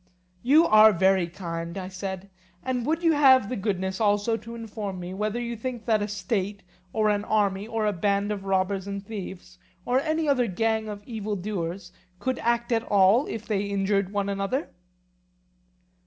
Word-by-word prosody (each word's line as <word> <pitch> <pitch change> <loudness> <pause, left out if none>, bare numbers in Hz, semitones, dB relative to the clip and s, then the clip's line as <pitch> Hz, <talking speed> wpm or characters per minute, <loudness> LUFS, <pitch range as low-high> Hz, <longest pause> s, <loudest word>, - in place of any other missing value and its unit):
You 300 - +5
are 215 -3 +7
very 190 0 +3
kind, 170 0 -6
I 185 -1 -4
said; 190 0 -6 0.3
and 255 -1 -2
would 325 +2 0
you 330 - +5
have 265 -7 +5
the 255 - -2
goodness 190 -1 -2
also 205 +2 +2
to 230 +1 -8
inform 210 -4 -6
me, 180 +1 -6
whether 210 +4 -2
you 235 0 -3
think 240 0 -5
that 220 -3 +2
a 205 - -1
state, 200 0 -3 0.3
or 215 +1 +2
an 205 0 0
army, 205 -2 0
or 225 -1 -1
a 210 - +1
band 200 +3 0
of 200 -2 -4
robbers 190 0 0
and 200 0 -5
thieves, 190 -3 -8 0.3
or 250 +1 +2
any 315 +2 -1
other 250 -4 +2
gang 220 +2 0
of 205 -1 -7
evil 215 -3 -4
doers 180 -2 -4 0.3
could 260 0 -2
act 235 +1 0
at 230 -1 +3
all 205 +6 +4
if 225 0 -5
they 210 -4 0
injured 200 -1 0
one 200 -1 -1
another? 200 +9 -2
205 Hz, 180 wpm, -26 LUFS, 195-230 Hz, 0.3 s, are